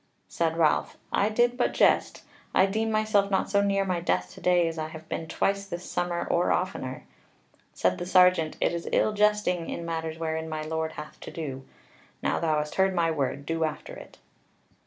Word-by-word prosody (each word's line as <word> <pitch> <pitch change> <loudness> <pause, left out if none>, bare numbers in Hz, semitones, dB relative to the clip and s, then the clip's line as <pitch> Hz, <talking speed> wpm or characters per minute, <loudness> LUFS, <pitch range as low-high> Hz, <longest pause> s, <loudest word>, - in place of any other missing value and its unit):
Said 165 -1 -1
Ralph: 160 -2 +2
"I 200 - +2
did 240 +3 +2
but 250 - 0
jest; - - +3 0.3
I 190 - +6
deem 220 +3 -1
myself 215 -2 +2
not 190 -1 0
so 200 - +4
near 195 -1 +1
my 180 -2 0
death 90 - -1
to - - -13
day 175 -2 +3
as 165 -1 -4
I 155 - -2
have 160 0 -11
been 160 - -4
twice 200 +4 -1
this 175 -2 -6
summer 175 -1 -2
or 175 +1 +2
oftener." 130 -8 -2 0.7
Said 90 0 +1
the 175 - -4
sergeant, 180 -4 +4
"It - - +1
is 170 0 -4
ill 215 - +2
jesting 210 -5 +1
in 170 - -4
matters 160 -1 -3
wherein 160 0 -3
my 155 -1 -3
Lord 160 0 -2
hath 150 0 -9
to - - -8
do. 135 -5 -6 0.6
Now - - +1
thou 155 -2 +1
hast 150 0 -2
heard 190 -1 +2
my 165 -2 +2
word: 140 -2 -2
do 165 +1 -1
after 155 -1 -4
it." - - -12
170 Hz, 200 wpm, -27 LUFS, 160-195 Hz, 0.7 s, I